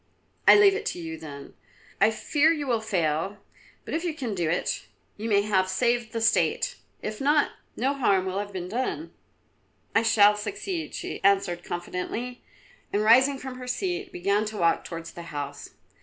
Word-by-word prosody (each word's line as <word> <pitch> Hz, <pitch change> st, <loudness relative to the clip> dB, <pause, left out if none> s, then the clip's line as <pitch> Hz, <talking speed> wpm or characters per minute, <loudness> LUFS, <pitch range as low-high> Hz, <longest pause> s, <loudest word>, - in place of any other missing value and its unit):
"I -, -, +10 dB
leave 405 Hz, -1 st, +7 dB
it 415 Hz, +2 st, -3 dB
to -, -, -3 dB
you, 160 Hz, -1 st, -6 dB
then. 140 Hz, -3 st, -9 dB, 0.5 s
I 215 Hz, -, +7 dB
fear 295 Hz, +7 st, +2 dB
you 300 Hz, -3 st, -1 dB
will 235 Hz, -4 st, +1 dB
fail, 180 Hz, -2 st, -1 dB, 0.5 s
but -, -, -6 dB
if 330 Hz, -, -1 dB
you 340 Hz, -4 st, -2 dB
can 250 Hz, -8 st, -3 dB
do 175 Hz, -4 st, -1 dB
it, 170 Hz, -, -1 dB, 0.3 s
you 220 Hz, +2 st, -4 dB
may 200 Hz, -1 st, +4 dB
have 190 Hz, -3 st, +1 dB
saved 235 Hz, +3 st, +1 dB
the 230 Hz, -, -2 dB
State. 365 Hz, -, +2 dB, 0.3 s
If 215 Hz, +2 st, -4 dB
not, 295 Hz, +2 st, +3 dB, 0.2 s
no 265 Hz, +4 st, +1 dB
harm 200 Hz, -9 st, +2 dB
will 190 Hz, +1 st, -2 dB
have 205 Hz, 0 st, -4 dB
been 180 Hz, -2 st, -5 dB
done." 260 Hz, -, -3 dB, 0.8 s
"I 225 Hz, -, +4 dB
shall 210 Hz, -2 st, +5 dB
succeed," 345 Hz, -, -4 dB
she -, -, -5 dB
answered 195 Hz, -3 st, +2 dB
confidently, 180 Hz, +8 st, -4 dB, 0.5 s
and 205 Hz, -, +1 dB
rising 260 Hz, +5 st, +6 dB
from 260 Hz, -1 st, -7 dB
her 250 Hz, -, -7 dB
seat 360 Hz, +7 st, -2 dB
began 200 Hz, +4 st, +1 dB
to 215 Hz, 0 st, -5 dB
walk 170 Hz, -3 st, +2 dB
towards 165 Hz, -1 st, -7 dB
the 175 Hz, -, -9 dB
house. 145 Hz, -3 st, -6 dB
215 Hz, 180 wpm, -26 LUFS, 185-265 Hz, 0.8 s, I